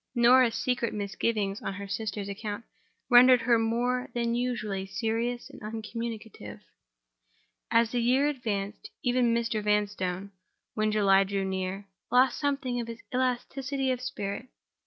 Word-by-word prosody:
Norah's 240 0 +5
secret 240 -3 -1
misgivings 205 0 -1
on 195 - -4
her 200 0 -6
sister's 205 0 -3
account 205 +2 -5 0.4
rendered 250 0 +7
her 230 0 +3
more 245 +3 0
than 235 -1 0
usually 215 -6 -2
serious 230 +3 -2
and - - -13
uncommunicative, 220 - -6 1.1
as 230 0 +3
the 245 - 0
year 255 +4 +3
advanced. 215 -7 -3
Even 245 -1 +2
Mr. 230 -2 0
Vanstone, 200 -2 -1 0.4
when 215 0 +1
July 195 -2 +5
drew 195 0 -2
nearer, 190 +1 -3 0.3
lost 255 0 +4
something 275 -4 -1
of 230 - -6
his 230 0 -8
elasticity 260 +2 -1
of 250 -1 -2
spirit. 205 -1 -4
230 Hz, 135 wpm, -28 LUFS, 205-245 Hz, 1.1 s, rendered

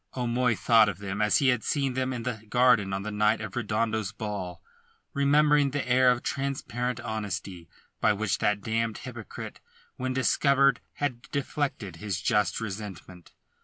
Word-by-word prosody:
O'Moy 125 -1 +1
thought 110 0 +5
of 95 - -5
them 100 +1 -4
as 105 0 +4
he 135 - +3
had 125 -3 +1
seen 140 -3 0
them 130 0 -1
in 120 -2 -4
the 120 -3 -3
garden 120 -5 +4
on 95 0 -2
the 110 - -4
night 105 +1 +2
of - - -6
Redondo's 110 -2 -1
ball, 100 -5 -5 0.5
remembered 145 0 +3
the 145 -3 -2
air 130 +1 +5
of 125 -1 +1
transparent 125 -3 -2
honesty 100 -6 -5 0.3
by 110 - +4
which 105 -1 -1
that 105 0 +1
damned 115 0 -1
hypocrite 120 -4 -8 0.4
when 130 0 -2
discovered 140 0 +3 0.2
had 130 -5 -2
deflected 135 - -3
his 100 -2 -3
just 105 -3 +1
resentment. 95 -4 -8
115 Hz, 160 wpm, -27 LUFS, 105-130 Hz, 0.5 s, thought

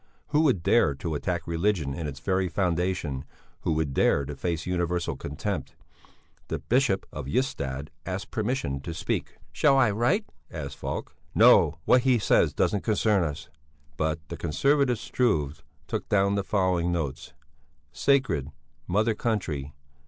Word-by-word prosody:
Who 150 +1 +3
would 130 - +2
dare 70 - +4
to 80 +3 -4
attack 85 +3 -2
religion 85 -4 0
in 75 +2 -4
its 70 -2 -6
very 95 +1 0
foundation, 90 -5 -1 0.4
who - - 0
would 75 -3 -1
dare 70 +1 +3
to 70 +1 -6
face 85 +2 -2
universal 90 -1 -1
contempt? - - -4 0.7
The - - -2
Bishop 120 -5 +1
of - - -6
Ystad 70 - -2
asked 95 +2 -5
permission 110 - -1
to 80 +4 -6
speak. - - -3
"Shall 140 -2 +4
I 120 -5 +4
write?" 140 - +1 0.2
asked 70 -4 -6
Falk. - - -5 0.2
"No, - - +6
what 125 - +5
he 130 -1 +3
says 110 - +3
doesn't 100 - +1
concern 105 -3 +2
us." 75 -1 -4 0.5
But 80 +1 -2
the 85 - -5
conservative 130 - +2
Struve 80 - 0 0.3
took - - -4
down 100 0 +3
the 100 -1 0
following 95 -3 +1
notes: 80 -6 -3 0.6
Sacred. 130 - +2
Int. 75 +1 -13 0.3
Mother 105 +5 +2
country. 80 - -2
90 Hz, 150 wpm, -27 LUFS, 75-110 Hz, 0.7 s, No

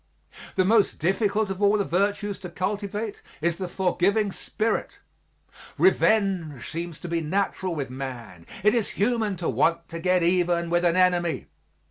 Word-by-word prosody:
The 185 - +3
most 215 +1 +3
difficult 200 +4 +1
of 195 +1 -5
all 205 +1 +4
the 200 - 0
virtues 200 +3 0
to 185 -2 -7
cultivate 205 +4 -3 0.2
is 170 +1 0
the 185 - -3
forgiving 190 +3 +1
spirit. 220 +3 -2 0.8
Revenge 190 - +2
seems 170 -1 -5
to - - -6
be 170 -1 -1
natural 185 +1 -1
with 140 -4 -4
man; 120 -10 -7 0.2
it 210 +1 +5
is 230 -4 0
human 220 -1 +1
to 170 - -3
want 170 0 +1
to 165 - -6
get 180 0 +2
even 175 -1 +1
with 175 0 +2
an 170 0 +3
enemy. 180 -2 +2
185 Hz, 155 wpm, -25 LUFS, 170-205 Hz, 0.8 s, it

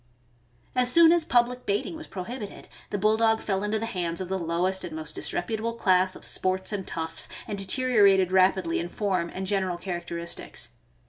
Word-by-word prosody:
As 250 0 +3
soon 335 +3 +7
as 340 -1 +4
public 245 -2 +1
baiting 205 +11 -1
was 320 0 -9
prohibited, 205 +3 -7 0.2
the 205 - -2
Bulldog 220 +2 +3
fell 195 -2 -1
into 210 +1 0
the 220 - -3
hands 175 -6 -3
of 185 -1 -5
the 190 0 -1
lowest 175 +3 -1
and 160 - -6
most 155 -1 -6
disreputable 220 +5 -3
class 185 -4 +2
of - - -11
sports 185 +2 -1
and 195 -2 -4
toughs, 160 0 -3 0.2
and 210 - -3
deteriorated 200 -3 +4
rapidly 185 -2 +3
in 170 - -4
form 185 -4 -1
and 190 - -5
general 190 -2 0
characteristics. 170 -1 -6
190 Hz, 175 wpm, -26 LUFS, 180-220 Hz, 0.2 s, soon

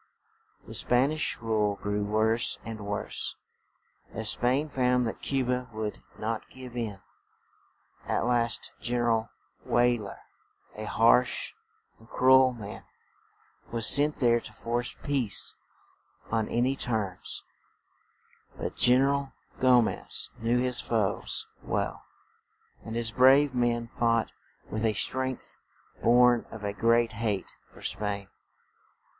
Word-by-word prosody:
The - - -10
Span 125 +4 +3
ish 155 0 -1
rule 110 -3 0
grew 105 0 -2
worse 110 +3 +1
and 110 -3 -7
worse, 100 0 -3 0.8
as 110 0 +3
Spain 130 +5 +1
found 125 -3 +1
that 115 - -5
Cu 135 -2 -1
ba 125 0 -2
would 110 -1 -4 0.2
not 110 +1 -4
give 130 -2 -11
in. 110 -5 -4 1.1
At - - 0
last 120 -2 +1
Gen 120 +1 -2
er 120 -1 +2
al 115 0 0 0.3
Wey 120 0 +2
ler, 100 -2 -8 0.6
a 110 - -6
harsh 115 +4 +3 0.5
and 110 +1 -19
cru 130 +1 +4
el 130 -1 +6
man, 105 -3 -9 0.9
was 115 -1 +2
sent 150 +2 +5
there 120 -2 +3
to - - -11
force 120 +1 -3
peace 130 -8 +1 0.8
on 110 -1 0
an 120 - +1
y 130 +2 +2
terms; 110 -8 -3 1.1
but - - -5
Gen 125 +1 +5
er 135 - +3
al 140 -1 -2 0.3
Go 125 -2 +5
mez - - -2
knew 115 +2 +1
his 125 0 0
foes 110 -4 -1 0.2
well, - - -2 0.8
and 110 - -6
his 115 -1 0
brave 135 +3 +5
men 120 -1 0
fought 115 -1 0 0.4
with 110 +1 -4
a 110 -1 +2
strength 130 +5 -2 0.4
born 120 0 +4
of 110 -2 -10
a 100 0 -2
great 115 +2 +2
hate 110 -4 -3 0.2
for - - -15
Spain. 100 -1 -3
120 Hz, 135 wpm, -28 LUFS, 110-125 Hz, 1.1 s, el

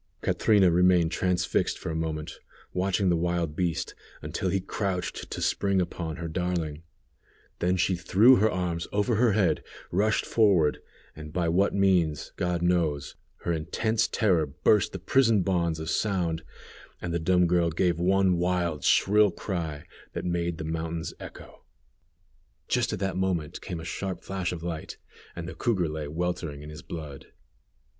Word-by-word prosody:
Catrina 100 -5 +4
remained 90 -1 +4
transfixed 90 -2 0
for - - -5
a - - -3
moment, 80 -1 -4 0.3
watching 95 +1 +1
the 85 - +3
wild 85 -2 -1
beast, 85 -2 -1 0.3
until 95 - -2
he 95 - +1
crouched 95 -1 -3
to - - -5
spring 100 -1 +1
upon 85 -3 -3
her 85 -1 -5
darling; 80 -2 -2 0.9
she 95 +1 +1
then 85 -1 -5
threw 115 +9 +6
her 110 +3 +3
arms 90 -3 -2
over 105 +2 +1
her 115 -2 +4
head, 95 -7 +2 0.3
rushed 105 +4 +1
forward, 95 -9 +3 0.4
and 75 0 -9
by 85 +1 0
what 95 +5 +2
means, 90 -6 +2
God 90 -1 -1
knows, 80 -6 0 0.3
her 85 - -1
intense 110 +8 0
terror 90 -8 +2
burst 95 +9 +2
the - - -5
prison 115 +1 +3
bonds 85 -3 0
of 80 - -5
sound, 85 -5 0 0.6
and 85 -1 -4
the 85 - 0
dumb 90 +2 +3
girl 85 -1 +2
gave 85 0 +1
one 95 0 +3
wild, 90 -3 0
shrill 105 +1 +4
cry, 85 -5 -4 0.3
that - - -4
made 85 -1 -1
the 80 - -5
mountains 80 +1 -3
echo. - - -11 1.0
Just 125 -1 +1
at 105 - -2
that 95 -1 -2
moment 90 -6 -1
came 85 - -5
a 80 - -8
sharp 95 +2 -4
flash 95 -2 -3
of 85 -2 -6
light, 85 -3 -5 0.4
and 85 -1 -6
the 90 - -6
cougar 100 -9 0
lay 75 -1 -4
weltering 80 -2 -3
in 75 - -9
his 75 -2 -9
blood. 75 -4 -8
90 Hz, 160 wpm, -27 LUFS, 80-95 Hz, 1.0 s, threw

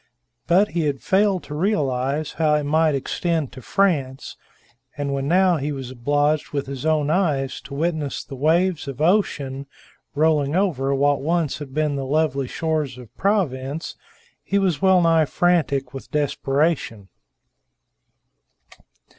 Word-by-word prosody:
But 185 +5 +4
he 165 0 -1
had 140 -2 -2
failed 195 -1 +1
to 150 - -8
realize 150 -5 -1
how 155 -2 +2
it 150 - 0
might 155 +1 +2
extend 160 +2 -2
to 130 - -11
France; 140 - 0 0.6
and 140 -1 -2
when 135 0 -2
now 180 +1 +4
he 145 +1 -3
was 135 -3 -6
obliged 145 +4 0
with 140 -1 -1
his 140 +2 -5
own 155 -2 +2
eyes 150 -7 0
to 140 0 -8
witness 155 -2 -2
the - - -11
waves 165 +4 +1
of 135 -1 -6
ocean 145 -6 0 0.5
rolling 150 -1 +2
over 140 -8 +1
what 145 +1 +2
once 160 0 0
had 145 -3 -8
been 150 0 0
the 135 - -3
lovely 140 -2 0
shores 155 -4 -2
of 120 -1 -13
Provence, 155 -7 -1 0.5
he 200 - 0
was 185 -5 +1
well 190 -2 +5
nigh 165 -1 +4
frantic 155 -5 +1
with 135 - -9
desperation. 140 - -1
150 Hz, 145 wpm, -22 LUFS, 135-170 Hz, 0.6 s, well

